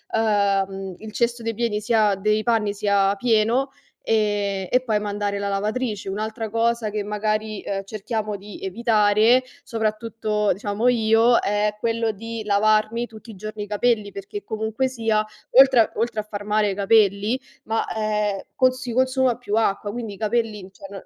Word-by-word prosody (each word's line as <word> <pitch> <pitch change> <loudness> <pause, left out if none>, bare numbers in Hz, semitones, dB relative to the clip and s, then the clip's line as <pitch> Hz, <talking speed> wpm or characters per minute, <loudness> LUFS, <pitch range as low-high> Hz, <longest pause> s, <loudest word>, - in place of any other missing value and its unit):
ehm, 195 -3 0
il 220 0 -9
cesto 235 +1 0
dei 230 0 -2
pieni 215 -2 -1
sia 215 -2 +2
dei 215 +2 +1
panni 220 -4 +1
sia 200 -1 +2
pieno 235 +4 +2 0.3
e 205 -3 0
e 250 - +4
poi 215 -3 +1
mandare 205 -1 -2
la 200 - -2
lavatrice. 210 +1 -2
Un'altra 220 +3 -4
cosa 230 0 0
che 210 0 -3
magari, 215 0 -2
ehm, 195 -1 -3
cerchiamo 215 +1 -4
di 205 +1 -11
evitare, 215 +3 +3 0.2
soprattutto 215 -1 -1
diciamo 205 +4 -2
io, 230 0 +4
è 210 +1 0
quello 230 0 0
di 230 +2 -6
lavarmi 215 +3 +2
tutti 225 +1 -12
i 210 - -11
giorni 215 +1 -6
i - - -8
capelli, 210 -1 0
perché 200 - -7
comunque 220 +4 -1
sia, 225 -4 0 0.3
oltre 260 -3 +6
oltre 220 -1 -1
a - - -12
far 205 -1 -7
male 210 0 +2
ai 195 - -1
capelli, 205 +2 +3 0.3
ma, 225 0 -1
ehm, 210 -2 -1
cons 255 -1 +2
si 250 -3 -5
consuma 260 0 +2
più 210 -4 -3
acqua, 205 -2 0
quindi 225 -3 -5
i - - -11
capelli, 220 -1 -1
cioè 195 - -12
non 195 -1 -9
215 Hz, 165 wpm, -23 LUFS, 205-230 Hz, 0.3 s, oltre